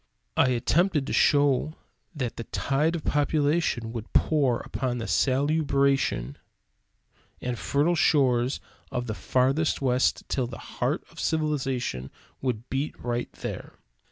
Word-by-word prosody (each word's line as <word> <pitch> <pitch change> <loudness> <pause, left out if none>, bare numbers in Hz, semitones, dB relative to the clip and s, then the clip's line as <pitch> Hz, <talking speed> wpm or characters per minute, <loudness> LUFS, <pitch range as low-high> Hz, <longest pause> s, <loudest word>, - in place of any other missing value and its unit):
I - - +4
attempted 145 +5 +2
to - - -4
show 145 +1 +3 0.4
that 130 -5 -3
the 115 - -6
tide 150 +5 0
of 165 - -4
population 145 -5 +1
would 115 -2 -6
pour 140 -7 +2
upon 125 +2 -3
the 115 - -4
salubrious 140 +1 +2
and - - -6 1.2
fertile 145 +5 +1
shores 130 -6 +3 0.3
of 125 0 -2
the 110 - -3
farthest 135 +8 +1
west 130 -1 +1
till 130 -3 -1
the 115 - -8
heart - - -2
of - - -12
civilization 135 - -1 0.3
would 120 -2 -2
beat 135 +3 -2
right 120 0 -3
there. - - -7
135 Hz, 130 wpm, -27 LUFS, 120-150 Hz, 1.2 s, I